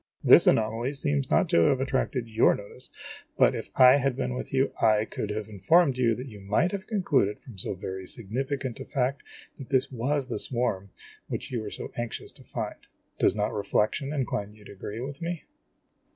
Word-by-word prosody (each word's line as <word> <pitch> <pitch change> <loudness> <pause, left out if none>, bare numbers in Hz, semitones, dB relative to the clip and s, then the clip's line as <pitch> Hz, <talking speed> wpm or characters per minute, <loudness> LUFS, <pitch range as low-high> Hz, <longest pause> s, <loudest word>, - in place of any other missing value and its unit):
This - - +7
anomaly 115 +4 +2
seems 75 - -1
not - - +3
to - - +4
have 130 - +3
attracted 130 -2 -1
your 110 +1 +4
notice; 105 +5 -10 0.5
but, - - +5
if - - -5
I 130 +1 +8
had 135 -2 0
been 125 -1 -2
with 125 - -5
you, 135 0 +2
I 110 0 +4
could 105 - -5
have 105 0 -3
informed 135 - +3
you 120 -3 +2
that 125 - -6
you 105 -5 -10
might 110 - +1
have 200 0 -5
concluded 145 - +1
from 115 -7 -12
so 95 - -2
very 95 0 -6
significant 130 +4 -3
a - - -6
fact 135 0 -1 0.4
that 135 - -9
this 130 0 +1
was 135 +3 -1
the 120 -5 -4
swarm 110 -6 0 0.4
which - - -5
you 120 -3 -2
are - - -4
so - - -7
anxious 120 -1 -4
to - - -15
find. - - -5 0.4
Does - - +3
not 105 0 -1
reflection 110 +6 0
incline 115 -8 -2
you 105 -1 -17
to - - -11
agree 100 +3 -7
with 140 +3 -6
me 170 -1 -4
125 Hz, 195 wpm, -27 LUFS, 105-135 Hz, 0.5 s, I